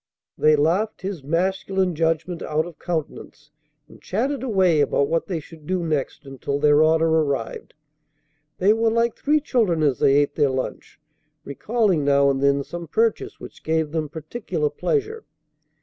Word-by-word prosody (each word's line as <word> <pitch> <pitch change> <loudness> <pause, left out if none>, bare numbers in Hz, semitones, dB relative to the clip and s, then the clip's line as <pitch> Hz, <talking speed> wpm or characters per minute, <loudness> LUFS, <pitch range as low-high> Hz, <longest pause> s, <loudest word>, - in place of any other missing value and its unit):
They 155 0 +4
laughed 180 +9 0
his 190 -6 -5
masculine 185 +4 0
judgment 165 +2 -1
out 155 +1 -1
of 175 -2 -11
countenance, 155 -2 -5 0.4
and - - -17
chatted 260 +8 -2
away 190 - +2
about 140 0 +1
what 165 0 0
they 175 -4 -2
should 155 0 -15
do 185 -1 -1
next, 150 -2 -3
until 135 +1 -4
their 145 +1 +4
order 160 +1 +3
arrived. 150 -7 -1 0.8
They 200 +3 +4
were 225 +1 +1
like 230 +1 +1
three 300 +1 +1
children 220 - +1
as 140 -5 +1
they 135 - +4
ate 145 0 +2
their 145 -3 +2
lunch, 130 0 -5 0.4
recalling 195 - 0
now 140 0 +4
and 135 0 -2
then 140 0 +2
some 170 +3 -8
purchase 225 +7 -1
which - - -12
gave 160 -1 0
them 155 -2 -2
particular 220 - -3
pleasure. 440 0 -2
160 Hz, 160 wpm, -22 LUFS, 150-195 Hz, 0.8 s, They